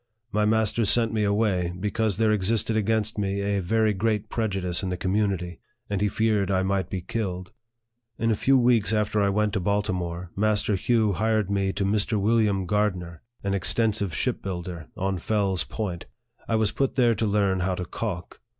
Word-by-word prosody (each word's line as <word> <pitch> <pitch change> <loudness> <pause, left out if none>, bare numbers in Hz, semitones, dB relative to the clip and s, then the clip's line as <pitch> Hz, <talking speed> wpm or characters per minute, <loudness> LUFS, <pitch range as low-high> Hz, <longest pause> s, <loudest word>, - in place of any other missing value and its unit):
My 105 0 +1
master 110 +1 +2
sent 115 +1 +3
me 110 -1 +1
away, 100 -4 +1
be 105 +2 -2
cause 110 -4 0
there 110 -1 +3
existed 110 +2 +1
against 110 0 0
me 100 0 -1
a 100 0 0
very 110 +4 +2
great 105 +1 -1
prejudice 95 -6 -1
in 95 - -3
the 90 - -2
community, 95 -3 -1 0.3
and 100 -1 -1
he 105 - +3
feared 105 -1 +1
I 95 -1 +2
might 95 0 -1
be 95 - -3
killed. 95 -2 -4 0.7
In 115 0 +1
a - - +2
few 135 +5 +3
weeks 120 -3 +3
after 105 0 +1
I 100 - +3
went 105 +1 +1
to 105 - +1
Baltimore, 90 -3 -2
Master 105 0 +1
Hugh 110 +1 +2
hired 110 0 0
me 100 -1 +1
to 100 - -1
Mr. 105 +2 +1
William 105 -2 +2
Gardner, 90 -5 -1 0.2
an 100 0 -1
extensive 100 -1 0
ship - - -1
builder, 85 -4 -5
on 95 -1 -1
Fell's 100 -1 0
Point. 95 -6 -5 0.4
I 115 - +1
was 110 -2 +2
put 135 -1 -1
there 120 -3 +4
to 110 0 -1
learn 100 -2 +1
how 90 0 0
to 90 - -4
calk. 90 -2 -5
100 Hz, 185 wpm, -25 LUFS, 95-110 Hz, 0.7 s, there